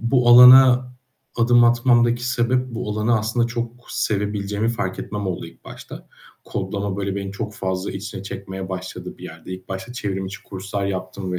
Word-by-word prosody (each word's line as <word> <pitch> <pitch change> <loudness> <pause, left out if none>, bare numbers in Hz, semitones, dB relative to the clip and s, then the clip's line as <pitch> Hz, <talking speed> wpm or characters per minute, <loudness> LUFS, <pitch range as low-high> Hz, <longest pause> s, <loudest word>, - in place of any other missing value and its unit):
bu 120 +1 +2
alana 125 +1 +8 0.4
adım 120 +1 +4
atmamdaki 120 0 +3
sebep, 125 +1 0
bu 115 -2 -4
alanı 110 +2 +1
aslında 110 +2 0
çok 120 0 -4 0.2
sevebileceğimi 105 +1 -1
fark 115 -5 -3
etmem 105 -1 -5
oldu 90 -2 -4
ilk 85 - -17
başta. - - -11 0.4
Kodlama, 100 0 -4
böyle 100 -1 -3
beni 100 -1 -5
çok 105 +1 -5
fazla 95 0 -3
içine 95 0 -7
çekmeye 95 -1 -7
başladı 95 0 -7
bir - - -11
yerde. - - -9
İlk 95 0 -13
başta 95 +5 -6
çevrimiçi 95 -4 -5
kurslar 100 +1 -5
yaptım 95 -1 -4
105 Hz, 160 wpm, -21 LUFS, 95-120 Hz, 0.4 s, alana